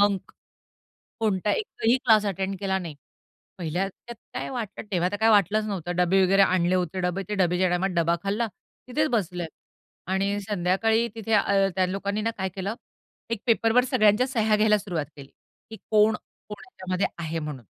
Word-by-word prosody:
Bunk. 200 -2 +1 0.9
कोणताही 210 -2 +1
एकही 245 - +1
class 220 -4 +4
attend 195 0 -2
केला 195 -1 0
नाही. 170 -5 -7 0.6
पहिल्या 175 +2 -1
त्यात 235 +5 -12 0.2
काय - - -4
वाटलं, 230 -5 -5
तेव्हा 180 -1 +1
तर - - -1
काय 220 +1 +4
वाटलंच 215 0 +3
नव्हतं. 185 -5 -3
डब्बे 180 +2 +3
वगैरे 195 +2 +4
आणले 185 -2 +3
होते, 180 0 -1
डबे 180 +2 -1
ते 210 - -1
डबेच्या 180 -1 +2
टायमात 180 +2 +1
डबा 170 0 +2
खाल्ला. 210 +4 0 0.4
तिथेच 305 +5 0
बसले 180 -4 -2 0.7
आणि 200 +1 0
संध्याकाळी 205 +4 +1
तिथे 225 0 -3
अ, 200 -1 +3
त्या 185 -1 +3
लोकांनी 200 +2 -2
ना 225 +2 0
काय 190 -1 -2
केलं? 195 +3 -3 0.5
एक 230 -3 -3
पेपरवर 230 +1 +3
सगळ्यांच्या 215 +4 +4
सह्या 220 -5 +2
घ्यायला 210 0 +4
सुरुवात 175 -7 -3
केली 140 -1 -12 0.4
की 220 - -8
कोण, 215 0 +5 0.3
कोण 210 - -5
ह्याच्यामध्ये 185 -6 -2
आहे 165 0 -3
म्हणून. 150 -6 -6
195 Hz, 170 wpm, -25 LUFS, 180-215 Hz, 0.9 s, कोण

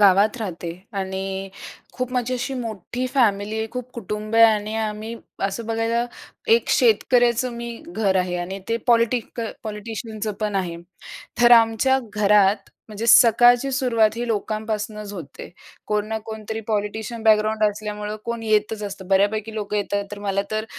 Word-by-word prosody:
गावात 200 +3 +5
राहते 175 -5 -5 0.3
आणि 190 0 -4 0.4
खूप 255 0 -3
माझी 250 0 0
अशी 250 +2 -3
मोठी 240 +1 -4
फॅमिली 215 -3 +2
आहे, 220 - -1
खूप 250 0 -6
कुटुंबीय 215 +1 +2
आणि 215 -1 +2
आम्ही 220 +1 -3 0.3
असं 210 +4 -3
बघायला 230 +1 0 0.5
एक 470 - 0
शेतकऱ्याचं 250 - +3
मी 235 0 -5 0.2
घर 210 - 0
आहे 180 -1 0
आणि 190 +3 -4
ते 230 - +1
पॉलिटिक 235 0 +2 0.2
पॉलिटिशियनचंपण 215 -1 -4
आहे. 175 -3 -2 0.7
तर 240 0 +7
आमच्या 230 +3 +5 0.2
घरात 205 -1 +3 0.2
म्हणजे 215 +2 -5
सकाळची 240 +3 +6
सुरुवात 235 -5 +3
ही 240 0 -2
लोकांपासनंच 215 -1 -3
होते. 165 -7 -9 0.4
कोण 210 0 0
ना 220 - -2
कोणतरी 220 0 -5
पॉलिटिशियन 220 +2 -2
बॅकग्राऊंड 215 0 +3
असल्यामुळं 210 0 -5
कोण 235 -1 -4
येतच 215 0 +1
असतं. 195 -2 -7
बऱ्यापैकी 210 +3 +1
लोकं 210 -1 -3
येतात, 200 0 -1
तर 205 - -6
मला 200 -1 -1
तर 215 0 -1
215 Hz, 140 wpm, -22 LUFS, 205-230 Hz, 0.7 s, तर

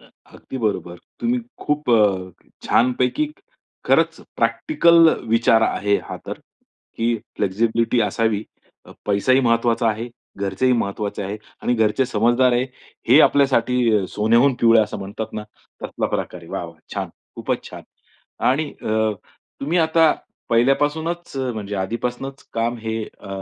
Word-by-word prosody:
हं, - - -21 0.2
अगदी 130 - -8
बरोबर. 95 -6 -2 0.2
तुम्ही 245 +1 0 0.2
खूप 150 -3 0
अ, 95 -5 +1 0.2
छानपैकी 125 - +2 0.6
खरंच - - +2 0.2
प्रॅक्टिकल 170 - +4 0.2
विचार 115 0 +4
आहे 100 -1 +1
हा - - -5
तर, - - -5 0.6
की 115 +1 +1 0.2
फ्लेक्सिबिलिटी 115 +4 +1
असावी 110 -1 0 0.4
अ, - - -12
पैसाही 115 +6 +3
महत्वाचा 115 -1 +2
आहे. 110 +3 -2 0.3
घरचेही 100 +6 +1
महत्वाचे 100 -2 -2
आहे. 100 +2 -4 0.3
आणि 125 - +1
घरचे 110 +3 +2
समजदार 120 +4 +3
आहे, 120 +1 +2 0.4
हे 140 +6 +8
आपल्यासाठी 125 -7 +3
सोन्याहून 115 +5 +3
पिवळ 115 -1 +6
असं 105 - -2
म्हणतात 105 +3 -6
ना, 105 - -4 0.4
तसला - - -2
प्रकार 90 - -4
आहे. 85 - -14
वाह, - - -3
वाह! 85 -1 -11 0.2
छान! - - -3 0.3
खूपच - - -2
छान! - - -9 0.7
आणि 145 +3 0
अ, 110 0 +1 0.5
तुम्ही 160 +6 0
आता 160 -1 +4 0.4
पहिल्यापासूनच 145 +7 +1 0.2
म्हणजे 105 -2 -5
आधीपासूनच 125 +7 -4
काम 115 +1 -1
हे 110 0 -3
अ, 100 - -14
115 Hz, 135 wpm, -21 LUFS, 105-130 Hz, 0.7 s, हे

